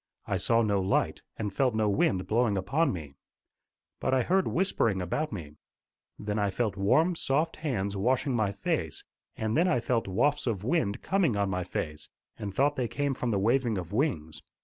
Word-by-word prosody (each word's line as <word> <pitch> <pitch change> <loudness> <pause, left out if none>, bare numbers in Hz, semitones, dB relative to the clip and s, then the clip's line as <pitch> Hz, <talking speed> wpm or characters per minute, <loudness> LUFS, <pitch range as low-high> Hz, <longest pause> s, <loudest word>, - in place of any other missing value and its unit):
I 100 - -1
saw 115 +5 +2
no 100 -2 +1
light, 95 +1 0 0.2
and 105 -3 -3
felt 125 0 +1
no 110 -1 +2
wind 100 -2 +1
blowing 110 -2 +2
upon 135 - +1
me. 75 -6 -6 0.9
But 130 - +1
I 130 - +2
heard 190 +5 +2
whispering 135 - +1
about 120 - -2
me. 75 -8 -7 0.6
Then 105 0 -2
I 100 -1 +1
felt 110 +1 -1
warm, 155 - +3
soft 160 +2 0
hands 100 -10 -2
washing 125 +6 +1
my 110 -4 +1
face, 100 -1 -2 0.3
and 110 0 -1
then 170 +4 +4
I 125 - +2
felt 120 -2 0
wafts 130 +10 +1
of 105 -5 -1
wind 120 -6 0
coming 175 - +2
on 100 -1 0
my 90 0 -1
face, 75 -4 -5 0.3
and 100 -2 -4
thought 140 +7 +1
they 125 -2 0
came 140 +3 -1
from 125 -1 -2
the 105 - +1
waving 115 +2 +2
of 90 +1 -6
wings. 105 - -1
110 Hz, 190 wpm, -29 LUFS, 100-135 Hz, 0.9 s, then